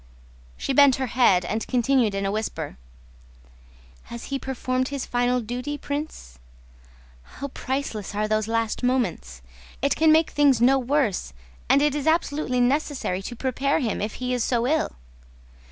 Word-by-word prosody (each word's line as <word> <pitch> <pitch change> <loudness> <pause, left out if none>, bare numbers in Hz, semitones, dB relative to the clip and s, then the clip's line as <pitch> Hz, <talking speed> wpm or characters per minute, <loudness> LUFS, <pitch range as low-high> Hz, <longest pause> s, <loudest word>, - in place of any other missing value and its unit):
She 275 - -2
bent 280 -1 +6
her 265 - -2
head 220 -8 +3
and 220 +4 -3
continued 245 -4 +2
in 195 0 -1
a 195 - 0
whisper: 200 -8 -4 1.3
"Has 235 0 -8
he 275 - 0
performed 255 -1 -2
his 280 -2 -4
final 245 0 +1
duty, 250 +6 -4
Prince? 285 - -6 0.8
How 280 - -8
priceless 255 -7 -4
are 210 +1 0
those 215 0 0
last 225 -1 -1
moments! 225 - -1 0.4
It 280 - +1
can 315 0 +4
make 320 +1 +4
things 285 -5 +4
no 265 +3 +4
worse, 245 - 0 0.4
and 280 - +5
it 295 -2 +2
is 295 0 -3
absolutely 300 -5 +1
necessary 255 -6 0
to 240 +5 -7
prepare 265 +3 0
him 230 -8 -2
if 210 +1 -3
he 250 0 -2
is 245 -2 0
so 240 -1 +1
ill. 310 +4 0
250 Hz, 155 wpm, -24 LUFS, 220-280 Hz, 1.3 s, bent